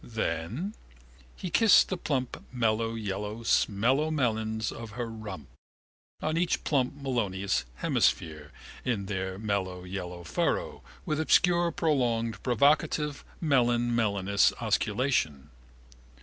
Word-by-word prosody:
Then? 115 Hz, -, -3 dB, 0.6 s
He 180 Hz, -, -6 dB
kissed 225 Hz, +3 st, +6 dB
the 190 Hz, -, -1 dB
plump 135 Hz, -7 st, -3 dB
mellow 115 Hz, -2 st, 0 dB
yellow 105 Hz, +1 st, -4 dB
smellow 125 Hz, +9 st, +2 dB
melons 110 Hz, -6 st, -1 dB
of 115 Hz, -2 st, -8 dB
her 120 Hz, +1 st, -3 dB
rump, 110 Hz, -, -8 dB, 0.8 s
on 155 Hz, +1 st, 0 dB
each 175 Hz, 0 st, 0 dB
plump 135 Hz, -2 st, +1 dB
melonous 105 Hz, -, -1 dB
hemisphere, 75 Hz, +3 st, 0 dB, 0.3 s
in 110 Hz, -6 st, -1 dB
their 95 Hz, -1 st, -3 dB
mellow 95 Hz, -4 st, -2 dB
yellow 90 Hz, -1 st, -6 dB
furrow, 85 Hz, -, -1 dB, 0.2 s
with 155 Hz, 0 st, -1 dB
obscure 175 Hz, +2 st, +4 dB
prolonged 120 Hz, -9 st, 0 dB
provocative 145 Hz, +3 st, +2 dB, 0.2 s
melonsmellonous 120 Hz, -, +2 dB
osculation. 75 Hz, -, 0 dB
115 Hz, 105 wpm, -28 LUFS, 100-140 Hz, 0.8 s, kissed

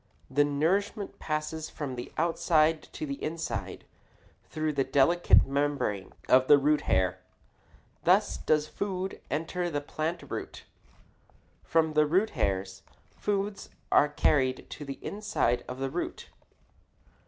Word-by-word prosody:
The 145 Hz, +2 st, +4 dB
nourishment 180 Hz, +8 st, -1 dB
passes 155 Hz, 0 st, -3 dB
from 140 Hz, -5 st, -5 dB
the 120 Hz, -, -7 dB
outside 160 Hz, -1 st, +2 dB
to -, -, -4 dB
the 140 Hz, -1 st, -6 dB
inside 165 Hz, +1 st, -4 dB, 0.7 s
through 155 Hz, -1 st, -1 dB
the 140 Hz, -1 st, +1 dB
delicate 140 Hz, +6 st, +4 dB
membrane 140 Hz, -8 st, -1 dB, 0.2 s
of 130 Hz, 0 st, +5 dB
the 145 Hz, -, +8 dB
root 150 Hz, +2 st, +2 dB
hair. 95 Hz, -1 st, +2 dB, 0.8 s
Thus -, -, +3 dB
does 155 Hz, -1 st, +1 dB
food 190 Hz, 0 st, -4 dB
enter 175 Hz, +4 st, -2 dB
the 145 Hz, -3 st, -1 dB
plant 155 Hz, +4 st, -3 dB
root. -, -, -6 dB, 1.0 s
From 160 Hz, -1 st, +2 dB
the 150 Hz, 0 st, +4 dB
root 190 Hz, +8 st, +2 dB
hairs, 95 Hz, 0 st, -2 dB, 0.3 s
foods 205 Hz, 0 st, -2 dB, 0.2 s
are 145 Hz, -, +5 dB
carried 130 Hz, -3 st, +1 dB
to 145 Hz, -, -7 dB
the 135 Hz, -1 st, -6 dB
inside 200 Hz, -, 0 dB
of 125 Hz, -, -6 dB
the 135 Hz, 0 st, -3 dB
root. 175 Hz, -, -4 dB
150 Hz, 130 wpm, -29 LUFS, 135-165 Hz, 1.0 s, the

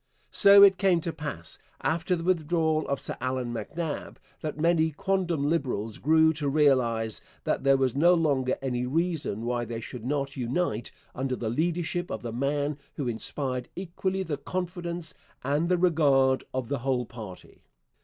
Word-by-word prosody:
So 200 Hz, -1 st, +8 dB
it 195 Hz, -1 st, +6 dB
came 190 Hz, -4 st, +3 dB
to 165 Hz, 0 st, -3 dB
pass, 145 Hz, -, -6 dB, 0.2 s
after 165 Hz, +3 st, +1 dB
the 165 Hz, -, -5 dB
withdrawal 160 Hz, -2 st, +1 dB
of 140 Hz, -, -1 dB
Sir -, -, -3 dB
Allan 130 Hz, -2 st, -2 dB
MacNab, 145 Hz, +8 st, -4 dB, 0.2 s
that 155 Hz, -1 st, -5 dB
many 160 Hz, 0 st, +3 dB
quondam 170 Hz, -3 st, 0 dB
Liberals 125 Hz, -9 st, -1 dB
grew 160 Hz, +2 st, +4 dB
to 150 Hz, -2 st, -2 dB
realize 125 Hz, -7 st, +2 dB, 0.2 s
that -, -, -1 dB
there 135 Hz, 0 st, +5 dB
was 130 Hz, -2 st, +1 dB
no 170 Hz, +5 st, +5 dB
longer 140 Hz, -6 st, +1 dB
any 125 Hz, -2 st, -1 dB
reason 155 Hz, -, -1 dB
why 120 Hz, 0 st, -1 dB
they 115 Hz, 0 st, -5 dB
should 115 Hz, 0 st, -8 dB
not 140 Hz, +1 st, -2 dB
unite 125 Hz, -1 st, -1 dB, 0.2 s
under 130 Hz, 0 st, -2 dB
the 115 Hz, -3 st, -3 dB
leadership 175 Hz, +6 st, -1 dB
of 110 Hz, -, -5 dB
the 115 Hz, -2 st, -4 dB
man 145 Hz, +3 st, -1 dB, 0.2 s
who 140 Hz, -, -3 dB
inspired 125 Hz, +2 st, -2 dB
equally 190 Hz, +1 st, -2 dB
the 155 Hz, -5 st, -3 dB
confidence 175 Hz, 0 st, -2 dB, 0.3 s
and 145 Hz, +6 st, 0 dB
the 180 Hz, -, +3 dB
regard 140 Hz, -7 st, +3 dB
of 130 Hz, -2 st, -3 dB
the 140 Hz, +1 st, -2 dB
whole 125 Hz, -1 st, 0 dB
party. 110 Hz, -6 st, -11 dB
145 Hz, 165 wpm, -27 LUFS, 125-170 Hz, 0.3 s, So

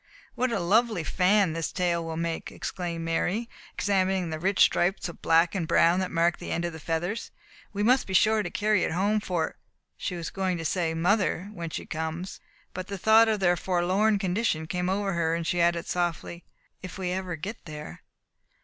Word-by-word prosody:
"What 255 Hz, 0 st, 0 dB
a 230 Hz, -, 0 dB
lovely 210 Hz, +1 st, +2 dB
fan 185 Hz, 0 st, +2 dB
his 165 Hz, 0 st, -3 dB
tail 175 Hz, -2 st, 0 dB
will 165 Hz, -1 st, -5 dB
make!" 165 Hz, 0 st, -3 dB
exclaimed 170 Hz, -3 st, -4 dB
Mary, 180 Hz, +7 st, -1 dB, 0.3 s
examining 190 Hz, -3 st, +1 dB
the 155 Hz, -, -4 dB
rich 195 Hz, +4 st, 0 dB
stripes 180 Hz, +2 st, +3 dB
of 170 Hz, -, -10 dB
black 165 Hz, +1 st, +3 dB
and 180 Hz, -5 st, -2 dB
brown 170 Hz, +3 st, +4 dB
that 185 Hz, -1 st, -1 dB
marked 170 Hz, +1 st, +1 dB
the -, -, -7 dB
end 170 Hz, +1 st, -1 dB
of 170 Hz, -, -3 dB
the 160 Hz, -, -8 dB
feathers. 175 Hz, +7 st, -3 dB, 0.4 s
"We 205 Hz, 0 st, -2 dB
must 255 Hz, +4 st, +3 dB
be 190 Hz, -, -2 dB
sure 215 Hz, +2 st, +4 dB
to 185 Hz, -, -4 dB
carry 210 Hz, +1 st, +1 dB
it -, -, 0 dB
home 205 Hz, +5 st, +1 dB
for 175 Hz, -5 st, -2 dB, 0.2 s
," -, -, -52 dB
she 180 Hz, -, -3 dB
was 170 Hz, -2 st, -5 dB
going 185 Hz, -2 st, -1 dB
to 165 Hz, -, -5 dB
say 165 Hz, -1 st, 0 dB
"mother 190 Hz, +2 st, +1 dB
when 170 Hz, -4 st, -5 dB
she -, -, -5 dB
comes," 160 Hz, +4 st, -5 dB, 0.3 s
but 185 Hz, 0 st, -5 dB
the 200 Hz, -, -5 dB
thought 220 Hz, +4 st, +6 dB
of 215 Hz, -2 st, 0 dB
their 175 Hz, -1 st, +4 dB
forlorn 185 Hz, +5 st, +1 dB
condition 185 Hz, -4 st, 0 dB
came 180 Hz, +2 st, -2 dB
over 195 Hz, 0 st, 0 dB
her, 165 Hz, -1 st, +1 dB
and 170 Hz, 0 st, -3 dB
she 175 Hz, +1 st, +1 dB
added 170 Hz, 0 st, +2 dB
softly 175 Hz, -1 st, -3 dB, 0.4 s
"if 185 Hz, +1 st, -8 dB
we 185 Hz, -2 st, -2 dB
ever 185 Hz, -2 st, -3 dB
get 190 Hz, +8 st, -7 dB
there." 150 Hz, -, -8 dB
180 Hz, 205 wpm, -27 LUFS, 170-200 Hz, 0.4 s, thought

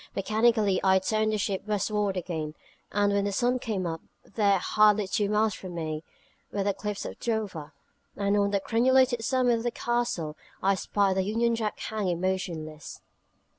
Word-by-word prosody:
Mechanically 215 Hz, -1 st, +2 dB
I 190 Hz, -1 st, +5 dB
turned 215 Hz, +3 st, +1 dB
the 215 Hz, -, 0 dB
ship 195 Hz, -1 st, -1 dB
westward 210 Hz, -1 st, 0 dB
again; 160 Hz, -4 st, -4 dB, 0.4 s
and 205 Hz, 0 st, +2 dB
when 200 Hz, 0 st, +1 dB
the 205 Hz, -, 0 dB
sun 245 Hz, +5 st, +1 dB
came 210 Hz, -6 st, -2 dB
up, 165 Hz, -1 st, -3 dB, 0.2 s
there, 200 Hz, -3 st, +2 dB
hardly 210 Hz, +2 st, +3 dB
two 200 Hz, +1 st, 0 dB
miles 210 Hz, 0 st, +2 dB
from 185 Hz, -2 st, -8 dB
me, 155 Hz, -1 st, -3 dB, 0.5 s
were 200 Hz, -, -1 dB
the 200 Hz, 0 st, +1 dB
cliffs 210 Hz, +1 st, -4 dB
of -, -, -7 dB
Dover; 205 Hz, -10 st, -3 dB, 0.4 s
and 200 Hz, 0 st, +1 dB
on 200 Hz, -1 st, +2 dB
the 200 Hz, 0 st, +1 dB
crenulated 245 Hz, +2 st, +3 dB
summit 250 Hz, -1 st, +2 dB
of -, -, -6 dB
the 240 Hz, -, +1 dB
Castle 235 Hz, -11 st, -2 dB, 0.3 s
I 195 Hz, +1 st, +4 dB
spied 195 Hz, 0 st, +1 dB
the -, -, +3 dB
Union 230 Hz, +4 st, +1 dB
Jack 220 Hz, -2 st, -2 dB
hang 195 Hz, -6 st, -2 dB
motionless. 170 Hz, -5 st, -3 dB
205 Hz, 170 wpm, -27 LUFS, 190-220 Hz, 0.5 s, I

